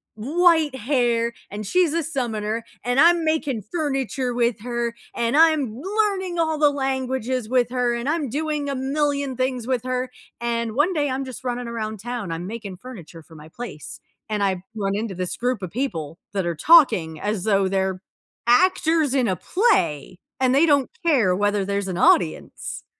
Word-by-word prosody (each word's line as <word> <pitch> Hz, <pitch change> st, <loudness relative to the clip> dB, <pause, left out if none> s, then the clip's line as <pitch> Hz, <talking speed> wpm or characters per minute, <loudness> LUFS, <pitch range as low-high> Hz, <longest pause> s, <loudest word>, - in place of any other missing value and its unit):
white 315 Hz, +4 st, +3 dB
hair, 240 Hz, -2 st, +1 dB, 0.2 s
and 210 Hz, +1 st, -6 dB
she's 345 Hz, -, +2 dB
a 335 Hz, -, 0 dB
summoner, 230 Hz, -7 st, -2 dB, 0.2 s
and 245 Hz, +2 st, +1 dB
I'm 340 Hz, +2 st, +6 dB
making 300 Hz, -7 st, 0 dB
furniture 270 Hz, -5 st, -1 dB
with 235 Hz, -1 st, +1 dB
her, 235 Hz, 0 st, -2 dB, 0.2 s
and 235 Hz, +5 st, +1 dB
I'm 300 Hz, -8 st, +3 dB
learning 385 Hz, -3 st, -1 dB
all 320 Hz, -1 st, +1 dB
the 295 Hz, -1 st, +4 dB
languages 260 Hz, -3 st, -2 dB
with 250 Hz, -2 st, +2 dB
her, 245 Hz, -1 st, 0 dB
and 235 Hz, +4 st, -3 dB
I'm 315 Hz, -2 st, 0 dB
doing 300 Hz, +1 st, -2 dB
a 275 Hz, -, -2 dB
million 280 Hz, 0 st, -1 dB
things 255 Hz, -2 st, -1 dB
with 255 Hz, -3 st, 0 dB
her, 255 Hz, 0 st, -2 dB, 0.3 s
and 235 Hz, -1 st, -1 dB
one 295 Hz, -, +2 dB
day, 290 Hz, -3 st, 0 dB
I'm 265 Hz, +1 st, -2 dB
just 260 Hz, 0 st, -8 dB
running 245 Hz, -1 st, -3 dB
around 220 Hz, -2 st, -4 dB
town, 235 Hz, -5 st, -5 dB
I'm 165 Hz, +2 st, -4 dB
making 205 Hz, -3 st, -7 dB
furniture 180 Hz, -8 st, -11 dB
for 160 Hz, +1 st, -17 dB
my 155 Hz, 0 st, -12 dB
place, 160 Hz, -, -8 dB, 0.3 s
and 210 Hz, -1 st, -1 dB
I 190 Hz, -2 st, 0 dB
run 200 Hz, -2 st, -1 dB
into 210 Hz, -2 st, -3 dB
this 180 Hz, 0 st, -3 dB
group 245 Hz, -3 st, -1 dB
of 185 Hz, -3 st, -5 dB
people, 170 Hz, -, -3 dB, 0.2 s
that 195 Hz, -3 st, -1 dB
are 170 Hz, -1 st, -1 dB
talking 175 Hz, -, +5 dB
as 205 Hz, -1 st, -2 dB
though 195 Hz, -3 st, +2 dB
they're 190 Hz, -1 st, -1 dB, 0.5 s
actors 315 Hz, +2 st, +3 dB
in 260 Hz, -4 st, +2 dB
a 190 Hz, -, +1 dB
play, 175 Hz, -, 0 dB, 0.2 s
and 260 Hz, -1 st, +3 dB
they 295 Hz, +4 st, +5 dB
don't 285 Hz, -4 st, +3 dB, 0.2 s
care 240 Hz, -, +3 dB
whether 205 Hz, 0 st, +1 dB
there's 200 Hz, 0 st, -2 dB
an 180 Hz, -, -3 dB
audience. 170 Hz, -3 st, +1 dB
245 Hz, 175 wpm, -23 LUFS, 205-285 Hz, 0.5 s, I'm